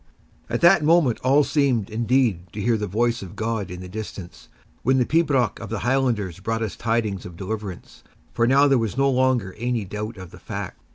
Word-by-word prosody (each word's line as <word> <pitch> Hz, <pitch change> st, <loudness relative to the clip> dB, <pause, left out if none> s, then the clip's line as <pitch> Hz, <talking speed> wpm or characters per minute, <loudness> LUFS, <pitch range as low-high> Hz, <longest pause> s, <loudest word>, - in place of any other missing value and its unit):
At -, -, -2 dB
that 175 Hz, -1 st, +6 dB
moment 155 Hz, -6 st, +3 dB
all 140 Hz, +3 st, +4 dB
seemed, 130 Hz, -9 st, +1 dB
indeed, 115 Hz, -6 st, +1 dB
to 105 Hz, -, -6 dB
hear 115 Hz, +3 st, +2 dB
the 105 Hz, -1 st, -2 dB
voice 120 Hz, +4 st, 0 dB
of 95 Hz, -3 st, -9 dB
God 110 Hz, -3 st, -2 dB
in 90 Hz, 0 st, -7 dB
the 90 Hz, -, -8 dB
distance, 95 Hz, -2 st, -8 dB, 0.3 s
when 130 Hz, +3 st, +2 dB
the 125 Hz, -, +3 dB
pibroch 140 Hz, -9 st, +1 dB
of 115 Hz, -, -7 dB
the 110 Hz, -, -2 dB
Highlanders 120 Hz, -9 st, 0 dB
brought 115 Hz, +3 st, -2 dB
us 110 Hz, -, -4 dB
tidings 110 Hz, -4 st, -1 dB
of 90 Hz, -2 st, -10 dB
deliverance; 100 Hz, -1 st, -6 dB, 0.3 s
for 115 Hz, -, +2 dB
now 140 Hz, +3 st, +5 dB
there 135 Hz, -3 st, +4 dB
was 115 Hz, +1 st, -3 dB
no 135 Hz, 0 st, +3 dB
longer 125 Hz, -7 st, +1 dB
any 120 Hz, -2 st, -1 dB
doubt 105 Hz, +3 st, -5 dB
of 95 Hz, -2 st, -10 dB
the -, -, -13 dB
fact. -, -, -6 dB
115 Hz, 205 wpm, -23 LUFS, 100-130 Hz, 0.3 s, that